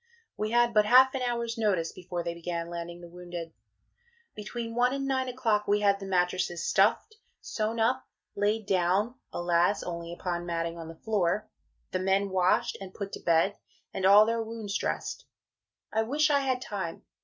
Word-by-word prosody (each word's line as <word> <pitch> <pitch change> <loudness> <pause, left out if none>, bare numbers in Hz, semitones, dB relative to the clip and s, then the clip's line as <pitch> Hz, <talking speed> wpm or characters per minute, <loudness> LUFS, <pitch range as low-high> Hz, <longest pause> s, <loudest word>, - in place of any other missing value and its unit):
We 215 - -2
had 240 0 +3
but 210 -1 +4
half 260 +3 +7
an 265 - -2
hour's 235 -1 -2
notice 185 -7 +1
before 175 -1 -5
they 170 - -3
began 170 0 -4
landing 170 0 -6
the 175 - -10
wounded. 175 -1 -8 0.8
Between 230 +2 -6
one 245 +2 +2
and 275 0 -2
9 260 -1 0
o'clock 230 -5 0
we 205 +1 +2
had 200 -1 +3
the 195 - -7
mattresses 180 -2 0
stuffed, 225 - +2 0.2
sewn 220 +1 -3
up, 255 +3 +1 0.3
laid 210 +1 0
down 190 +4 +1 0.2
alas! 175 +3 +1
only 170 -1 -5
upon 175 0 -4
matting 170 0 -2
on 165 - -7
the 165 - -9
floor 205 0 -1 0.4
the 185 - -1
men 195 +1 +1
washed 185 -1 +2
and 190 -1 -9
put 200 -1 -5
to - - -6
bed, 170 +4 +2 0.4
and 190 - -4
all 205 +2 +8
their 230 +1 0
wounds 220 -2 -5
dressed. - - -3 0.7
I 220 - +2
wish 295 +7 +2
I 285 - +4
had 260 -2 -1
time. 190 -5 -5
200 Hz, 180 wpm, -28 LUFS, 175-230 Hz, 0.8 s, all